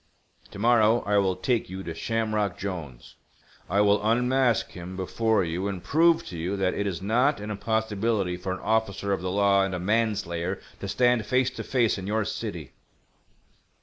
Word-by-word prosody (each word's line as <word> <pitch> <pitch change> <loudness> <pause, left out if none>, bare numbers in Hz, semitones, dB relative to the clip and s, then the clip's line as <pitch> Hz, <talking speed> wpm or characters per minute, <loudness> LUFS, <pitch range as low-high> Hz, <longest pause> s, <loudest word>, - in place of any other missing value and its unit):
To - - -11
morrow 115 +1 +4
I 105 0 +3
will 95 -2 +1
take 120 -2 -1
you 95 +1 -6
to 85 - -5
Shamrock 110 +1 -1
Jolnes—I 90 +2 -6
will 105 0 +3
unmask 125 +1 +2
him 90 +1 -8
before 105 +2 +1
you 90 +3 -2
and 95 -3 -5
prove 165 +2 +3
to 85 - -7
you 90 +5 -2
that 95 -1 +1
it 100 - -2
is 95 -2 -4
not 125 +7 +2
an 105 +1 -5
impossibility 110 -2 -1
for 90 +1 -5
an 95 - -4
officer 100 -2 0
of 95 - -2
the 90 - -2
law 100 0 +3
and 95 -1 -2
a - - -3
manslayer 95 -3 -1 0.2
to 100 - -5
stand 120 +2 +2
face 130 0 +2
to - - -6
face 120 -6 +1
in 95 - -6
your 110 0 0
city." - - -5
100 Hz, 180 wpm, -26 LUFS, 95-115 Hz, 0.2 s, morrow